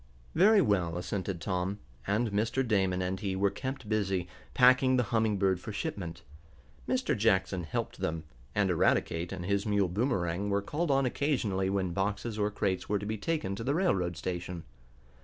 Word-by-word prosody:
"Very 205 +4 +6
well," 90 - +1
assented 95 0 -3
Tom, 95 +2 -2 0.3
and 105 +3 +1
Mr. 115 +6 0
Damon 95 -4 +1
and 95 +1 -2
he 95 -2 -2
were 100 +1 +2
kept 130 +2 -5
busy, 95 -4 0 0.3
packing 130 +1 +5
the 125 - +3
Humming 110 -2 +2
Bird 95 -2 +2
for 110 - -7
shipment. 90 -4 -4 0.7
Mr. - - +1
Jackson 95 -4 +1
helped 75 - -3
them, 80 0 -2 0.3
and 100 -2 +2
Eradicate 85 0 +1
and 95 -2 -5
his 100 +2 0
mule 100 -3 +2
Boomerang 100 -3 0
were 100 0 +1
called 155 +9 -2
on 135 -1 +3
occasionally 120 -9 0
when 95 -3 -1
boxes 105 +3 -2
or 105 0 +2
crates 95 -2 -2
were 105 - +2
to 100 - -5
be 110 +1 -2
taken 150 -7 -1
to 115 - -5
the 140 +5 0
railroad 90 - +1
station. 90 -1 -4
100 Hz, 175 wpm, -30 LUFS, 90-115 Hz, 0.7 s, Very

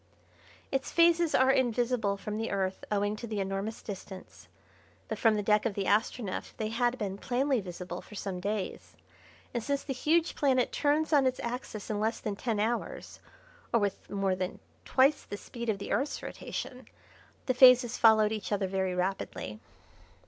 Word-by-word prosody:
Its 270 0 -1
phases 335 -1 +4
are 260 +1 +5
invisible 240 -5 +1
from 210 +1 -5
the 225 - -2
Earth 190 -1 -2
owing 205 0 +1
to 235 +2 -7
the 215 -2 -3
enormous 195 +3 -3
distance; 190 -2 -9 0.6
but - - -4
from 225 -2 +4
the 210 - -1
deck 210 +1 +3
of 220 -4 -1
the 200 - -1
Astronef 210 0 -1
they 215 -1 -2
had 240 +2 +1
been 200 -3 -4
plainly 260 0 +1
visible 180 -1 -7
for 210 - -13
some 195 -2 -4
days, 200 +1 -4 0.6
and, 240 - -1
since 280 +2 -1
the 270 - -3
huge 320 +6 +2
planet 260 -4 +2
turns 305 +2 +1
on 280 -3 +5
its 255 - -1
axis 235 -3 -5
in 210 - -1
less 220 +2 0
than 210 -2 -3
ten 220 0 -2
hours, 235 - -2 0.5
or 235 - +4
with 200 -2 -2
more 195 -2 0
than 185 0 -3 0.3
twice 275 +3 +4
the 205 - -7
speed 235 +2 -6
of 210 - +1
the 200 - -6
Earth's 280 - -1
rotation, 255 0 -6 0.6
the 255 - +1
phases 250 -1 +7
followed 220 -2 +6
each 215 -2 -4
other 205 -1 +1
very 190 -1 -1
rapidly. 180 - -3
220 Hz, 175 wpm, -30 LUFS, 200-255 Hz, 0.6 s, phases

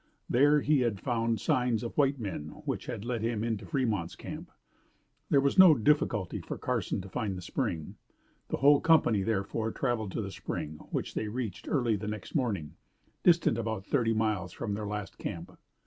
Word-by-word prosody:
There 145 +4 +4
he 150 0 +3
had 115 -6 0
found 115 -3 0
signs 120 0 +1
of 115 - -5
white 140 -2 +2
men 90 -9 -4 0.2
which - - -3
had 105 - -5
led 120 -2 -2
him 115 -1 -1
into 115 -3 -2
Fremont's 110 - -1
camp. - - -8 0.8
There 140 - +5
was 140 +6 +2
no 180 -5 +10
difficulty 115 - +1
for - - -6
Carson - - -1
to 95 - -9
find 95 0 -3
the - - -6
spring. 80 -2 -3 0.5
The - - -2
whole 145 +1 +5
company 145 -11 +4
therefore 110 +2 -1
traveled 115 -6 -1
to - - -1
the 100 - -5
spring, 75 -4 -5
which - - -3
they 110 - -2
reached 110 -3 -4
early 120 -7 +2
the 105 +1 -6
next 105 -2 -6
morning, 105 - -1 0.4
distant 170 -9 +4
about 110 -4 -3
thirty 115 -4 +1
miles 105 -5 0
from 110 -4 -3
their 105 0 -3
last 105 -1 -5
camp. - - -5
115 Hz, 180 wpm, -30 LUFS, 100-130 Hz, 0.8 s, no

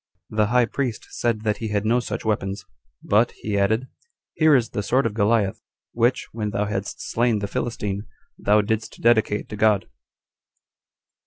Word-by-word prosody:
The 105 -1 +2
high 125 +2 +4
priest 125 -2 -3
said 115 -3 -1
that 105 -1 0
he 115 - -4
had 105 -1 -1
no 120 +3 +3
such 120 - -5
weapons; 100 -2 -1 0.4
but, 110 +4 +3
he 105 -1 -4
added, 110 +6 +1 0.5
"Here 155 -2 +5
is 120 -4 +1
the 105 - -2
sword 130 +5 +1
of 115 - 0
Goliath, 105 -2 +1 0.3
which, 120 +2 +1
when 105 -2 -3
thou 105 0 -1
hadst 100 -1 -4
slain 120 -1 +2
the 100 0 -3
Philistine, 105 -2 -3 0.3
thou 105 +1 +3
didst 110 +1 -3
dedicate 110 -3 +2
to 105 - -5
God." 105 -1 +2
110 Hz, 165 wpm, -23 LUFS, 105-115 Hz, 0.5 s, Here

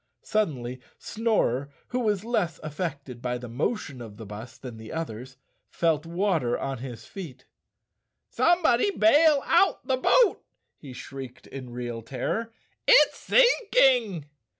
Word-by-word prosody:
Suddenly 130 - -2 0.2
Snorer, 175 - 0 0.2
who 250 - -1
was 210 -4 0
less 190 -9 -1
affected 145 -5 -5
by 125 0 -2
the 125 0 -8
mo¬ 135 - -1
tion 135 -10 -9
of 105 -3 -10
the 110 - -9
bus 105 +4 -9
than 125 -4 -9
the 110 0 -10
others, 130 -5 -6 0.3
felt 165 -2 0
water 170 -8 0
on 135 -2 -4
his 125 -2 -8
feet. 140 -10 -9 0.8
"Somebody 345 -3 +3
bail 295 - +4
out 345 +4 +3
the 260 -1 +1
boat," 455 - +3 0.3
he 140 - -12
shrieked 130 0 -9
in 130 -2 -9
real 120 -1 -5
terror, 135 - -3 0.4
"it's - - +6
sinking!" 270 - +3
155 Hz, 135 wpm, -26 LUFS, -, 0.8 s, it's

